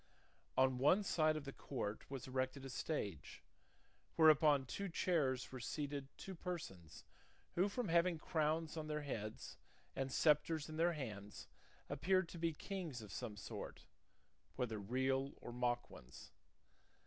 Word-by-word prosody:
On 130 Hz, -1 st, +4 dB
one 180 Hz, +10 st, +5 dB
side 155 Hz, -5 st, +3 dB
of 150 Hz, -, -5 dB
the 135 Hz, -, -5 dB
court 110 Hz, -6 st, -4 dB
was 135 Hz, -3 st, -5 dB
erected 130 Hz, +1 st, -2 dB
a 135 Hz, -, -5 dB
stage, 100 Hz, -, -3 dB, 0.7 s
where 160 Hz, -1 st, +8 dB
upon 150 Hz, -2 st, +4 dB
two 200 Hz, +9 st, -3 dB
chairs 150 Hz, -7 st, +1 dB
were 130 Hz, -, -5 dB
seated 145 Hz, +1 st, -3 dB
two 195 Hz, -, -6 dB
persons 160 Hz, -, -6 dB, 0.5 s
who 185 Hz, +4 st, +3 dB
from 225 Hz, -1 st, -2 dB
having 170 Hz, +1 st, +4 dB
crowns 155 Hz, +1 st, 0 dB
on 155 Hz, -1 st, -3 dB
their 150 Hz, -1 st, -2 dB
heads 110 Hz, -6 st, -5 dB, 0.4 s
and 135 Hz, 0 st, -1 dB
sceptres 150 Hz, +1 st, +3 dB
in 155 Hz, 0 st, -6 dB
their 170 Hz, +1 st, +4 dB
hands 105 Hz, -9 st, -6 dB, 0.4 s
appeared 185 Hz, 0 st, +2 dB
to 170 Hz, -, -8 dB
be 165 Hz, 0 st, +2 dB
kings 160 Hz, -, -5 dB
of 105 Hz, -, -9 dB
some 110 Hz, -5 st, -4 dB
sort, 100 Hz, -, -7 dB, 0.7 s
whether 115 Hz, -4 st, -1 dB
real 130 Hz, +6 st, 0 dB
or -, -, -7 dB
mock 120 Hz, 0 st, 0 dB
ones. 65 Hz, +2 st, -12 dB
140 Hz, 150 wpm, -40 LUFS, 125-165 Hz, 0.7 s, where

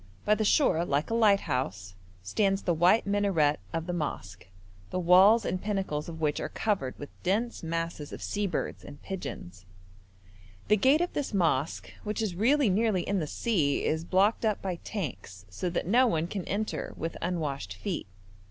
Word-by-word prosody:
By 210 Hz, -, +4 dB
the 215 Hz, -, +1 dB
shore, 205 Hz, -, +3 dB
like 145 Hz, +3 st, -1 dB
a -, -, +1 dB
lighthouse, 130 Hz, -, +1 dB, 0.3 s
stands 195 Hz, -, +1 dB
the 175 Hz, -, +1 dB
white 175 Hz, +7 st, +4 dB
minaret 195 Hz, -8 st, +2 dB
of 165 Hz, -1 st, -3 dB
the 180 Hz, -, -3 dB
mosque, 95 Hz, -, -5 dB, 0.4 s
the -, -, -3 dB
walls 185 Hz, +6 st, +6 dB
and 185 Hz, -, -2 dB
pinnacles 190 Hz, -7 st, -2 dB
of 160 Hz, -1 st, -8 dB
which 150 Hz, -2 st, 0 dB
are -, -, -3 dB
covered 190 Hz, -13 st, -2 dB
with 145 Hz, -, -9 dB
dense 220 Hz, +6 st, -1 dB
masses 165 Hz, -2 st, -3 dB
of -, -, -7 dB
sea 205 Hz, -1 st, -2 dB
birds 175 Hz, -, -3 dB
and 145 Hz, -, -11 dB
pigeons; 120 Hz, -, -7 dB, 1.1 s
the 210 Hz, -, +6 dB
gate 265 Hz, -, +4 dB
of 350 Hz, -, -1 dB
this 280 Hz, -7 st, -2 dB
mosque, 160 Hz, -5 st, 0 dB
which 210 Hz, +1 st, -3 dB
is 215 Hz, -5 st, -1 dB
really 255 Hz, +9 st, +3 dB
nearly 200 Hz, -1 st, +2 dB
in 200 Hz, 0 st, 0 dB
the 155 Hz, -, -2 dB
sea, 155 Hz, -8 st, 0 dB
is 160 Hz, +1 st, 0 dB
blocked 195 Hz, +7 st, +2 dB
up 215 Hz, -2 st, +1 dB
by 185 Hz, -3 st, -3 dB
tanks, 95 Hz, -, -6 dB
so 175 Hz, -, -3 dB
that 170 Hz, -, -2 dB
no 245 Hz, +8 st, +4 dB
one 165 Hz, -7 st, 0 dB
can 190 Hz, +1 st, -5 dB
enter 210 Hz, +2 st, -3 dB
with 165 Hz, +1 st, -4 dB
unwashed 145 Hz, -, -3 dB
feet. 175 Hz, -, -4 dB
180 Hz, 180 wpm, -29 LUFS, 150-210 Hz, 1.1 s, walls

